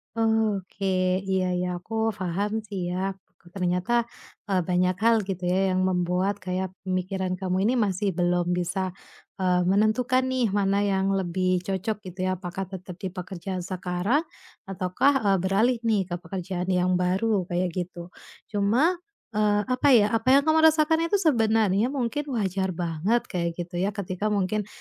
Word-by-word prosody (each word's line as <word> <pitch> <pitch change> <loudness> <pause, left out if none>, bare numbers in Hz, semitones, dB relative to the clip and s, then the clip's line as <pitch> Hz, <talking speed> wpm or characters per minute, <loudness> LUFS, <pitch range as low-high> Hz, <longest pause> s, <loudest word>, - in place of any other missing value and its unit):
Oke. 220 -4 0 0.4
Iya 190 -1 +1
iya, 180 0 -1
aku 180 +6 -11 0.3
faham 190 +3 -1
sih, 185 -4 -4
ya. 190 +2 -1 0.4
Ternyata, 180 +6 0 0.5
eee, 190 -2 +2
banyak 180 0 +2
hal, 230 +1 +4
gitu 185 -2 -5
ya, 190 +1 +2
yang 185 0 +1
membuat 180 +2 0
kayak 185 0 -2
pemikiran 185 0 -2
kamu 185 0 0
ini 230 +5 +3
masih 200 -2 0
belum 175 0 0
bisa, 180 +1 -1 0.5
eee, 180 -1 +2
menentukan 215 +7 +2
nih 255 -5 0
mana 200 0 +1
yang 195 -1 +1
lebih 185 0 0
cocok, 195 +3 -3
gitu 185 +1 -3
ya. 185 - 0
Apakah 185 +1 -5
tetap 185 -1 -8
di 190 - -3
pekerjaan 185 0 -5
sekarang, 185 - -1 0.4
ataukah, 190 +8 +1 0.2
eee, 195 - +4
beralih 220 +6 +2
nih 220 -4 +2
ke 175 - 0
pekerjaan 180 +1 -4
yang 180 0 +2
baru, 190 +1 +1
kayak 175 0 -1
gitu. 175 0 -6 0.4
Cuma, 240 - +2 0.3
eee, 210 -1 +2
apa 255 +4 0
ya, 210 -2 +4
apa 225 +2 -1
yang 280 - +5
kamu 315 +1 +3
rasakan 320 +1 +3
itu 405 - +1
sebenarnya 225 - +2
mungkin 275 +2 -2
wajar 190 -3 -1
banget, 175 +7 0
kayak 170 -2 -2
gitu, 175 0 -6
ya. 200 +3 -1
Ketika 200 +1 -3
mungkin 210 0 0
190 Hz, 155 wpm, -26 LUFS, 180-215 Hz, 0.5 s, yang